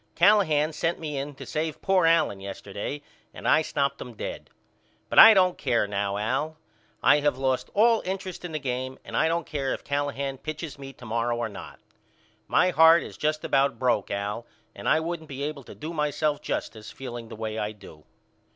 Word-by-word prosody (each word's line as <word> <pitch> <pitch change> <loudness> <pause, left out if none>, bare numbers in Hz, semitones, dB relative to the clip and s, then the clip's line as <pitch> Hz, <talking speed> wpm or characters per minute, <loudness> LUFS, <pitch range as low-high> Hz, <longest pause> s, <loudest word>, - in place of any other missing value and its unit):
Callahan 160 -7 +4
sent 165 +2 -1
me 150 -3 -5
in 140 +1 -4
to - - -9
save 155 0 -3
poor 190 -3 +3
Allen 165 -12 +3
yesterday 100 +8 -6 0.3
and - - -5
I 155 - +5
stopped 140 -3 -1
them 120 -2 -8
dead. - - -6 0.6
But - - +4
I 225 -1 +11
don't 185 -2 +3
care 120 -6 +1
now 100 0 -2
Al. 130 +9 -2 0.5
I 150 - +6
have 145 -3 +1
lost 130 -1 -1
all 225 +2 +4
interest 185 -1 -5
in 175 - -5
the 155 - -2
game 130 -1 -3
and - - -7
I - - +3
don't 165 -1 0
care 135 -3 -2
if - - -12
Callahan 140 -1 -2
pitches 155 -1 -6
me 135 -1 -8
to 120 - -14
morrow 115 +1 -1
or 120 -1 -2
not. 100 - -10 0.7
My 185 - +3
heart 160 0 +6
is - - -9
just 155 0 -1
about 135 -3 +2
broke 120 -5 +1
Al 105 +4 -3 0.3
and - - -3
I 155 - +4
wouldn't 160 -1 -5
be 140 0 -5
able 150 -1 -4
to - - -11
do 155 +3 -6
myself 150 -1 0
justice 110 -1 -4
feeling 120 -3 -7
the - - -8
way 110 0 -4
I 105 0 -2
do. 95 -7 -14
140 Hz, 195 wpm, -26 LUFS, 120-160 Hz, 0.7 s, I